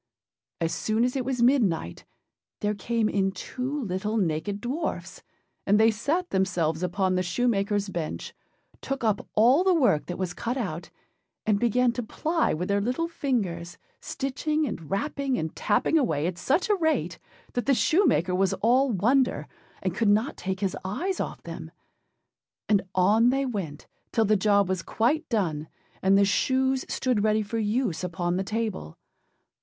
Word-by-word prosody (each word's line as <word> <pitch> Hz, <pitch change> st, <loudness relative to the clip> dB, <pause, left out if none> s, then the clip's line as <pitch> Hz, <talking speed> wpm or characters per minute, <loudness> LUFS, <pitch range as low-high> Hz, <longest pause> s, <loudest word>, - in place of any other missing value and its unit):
As 165 Hz, -1 st, -1 dB
soon 220 Hz, +2 st, 0 dB
as 250 Hz, +1 st, 0 dB
it 265 Hz, -, 0 dB
was 250 Hz, -2 st, -1 dB
midnight, 210 Hz, -, +1 dB, 0.6 s
there 210 Hz, 0 st, +1 dB
came 225 Hz, +2 st, 0 dB
in 195 Hz, -2 st, +1 dB
two 255 Hz, +9 st, -4 dB
little 210 Hz, +2 st, -2 dB
naked 190 Hz, +2 st, -1 dB
dwarfs; 260 Hz, +10 st, -4 dB, 0.5 s
and 205 Hz, +2 st, +4 dB
they 225 Hz, +1 st, +6 dB
sat 310 Hz, +12 st, -1 dB
themselves 175 Hz, -4 st, 0 dB
upon 185 Hz, +1 st, 0 dB
the 185 Hz, -, +1 dB
shoemakerâs 200 Hz, +1 st, 0 dB
bench, 165 Hz, -3 st, -4 dB, 0.5 s
took 270 Hz, -1 st, -4 dB
up 215 Hz, -3 st, 0 dB
all 250 Hz, +10 st, +5 dB
the 375 Hz, -1 st, +4 dB
work 245 Hz, -, +2 dB
that 175 Hz, -, -4 dB
was 185 Hz, -2 st, -3 dB
cut 240 Hz, +7 st, -3 dB
out, 175 Hz, -8 st, -4 dB, 0.6 s
and 210 Hz, -2 st, +2 dB
began 240 Hz, +2 st, +3 dB
to 245 Hz, -, -3 dB
ply 320 Hz, +8 st, 0 dB
with 180 Hz, +4 st, -2 dB
their 200 Hz, 0 st, +1 dB
little 255 Hz, +10 st, -1 dB
fingers, 200 Hz, -, -2 dB, 0.2 s
stitching 300 Hz, +3 st, -2 dB
and 165 Hz, -, -6 dB
rapping 275 Hz, +4 st, -1 dB
and 160 Hz, 0 st, -3 dB
tapping 325 Hz, -, +2 dB
away 155 Hz, -, 0 dB
at 175 Hz, 0 st, -3 dB
such 305 Hz, -, +1 dB
a 420 Hz, -, +3 dB
rate, 320 Hz, -5 st, 0 dB, 0.3 s
that 245 Hz, -, -2 dB
the 275 Hz, -, +4 dB
shoemaker 245 Hz, -, +2 dB
was 190 Hz, 0 st, +2 dB
all 255 Hz, +5 st, +3 dB
wonder, 245 Hz, +6 st, +2 dB, 0.4 s
and 185 Hz, -2 st, -1 dB
could 220 Hz, +2 st, +1 dB
not 220 Hz, +8 st, +2 dB
take 190 Hz, +1 st, -4 dB
his 195 Hz, -2 st, 0 dB
eyes 330 Hz, -, -2 dB
off -, -, -4 dB
them. -, -, -7 dB, 1.0 s
And 205 Hz, -2 st, +3 dB
on 210 Hz, +6 st, +4 dB
they 270 Hz, +2 st, +1 dB
went, 190 Hz, -, -5 dB, 0.3 s
till 225 Hz, -, +2 dB
the 215 Hz, +1 st, +3 dB
job 200 Hz, 0 st, +3 dB
was 185 Hz, -1 st, -1 dB
quite 285 Hz, -, 0 dB
done, 165 Hz, -10 st, -1 dB, 0.3 s
and 195 Hz, +1 st, +4 dB
the 200 Hz, -, +5 dB
shoes 260 Hz, +6 st, +1 dB
stood 250 Hz, -6 st, 0 dB
ready 215 Hz, 0 st, +2 dB
for 225 Hz, +3 st, -3 dB
use 215 Hz, -5 st, -1 dB
upon 175 Hz, 0 st, -1 dB
the 190 Hz, -, 0 dB
table. 215 Hz, -, -4 dB
215 Hz, 165 wpm, -26 LUFS, 185-255 Hz, 1.0 s, they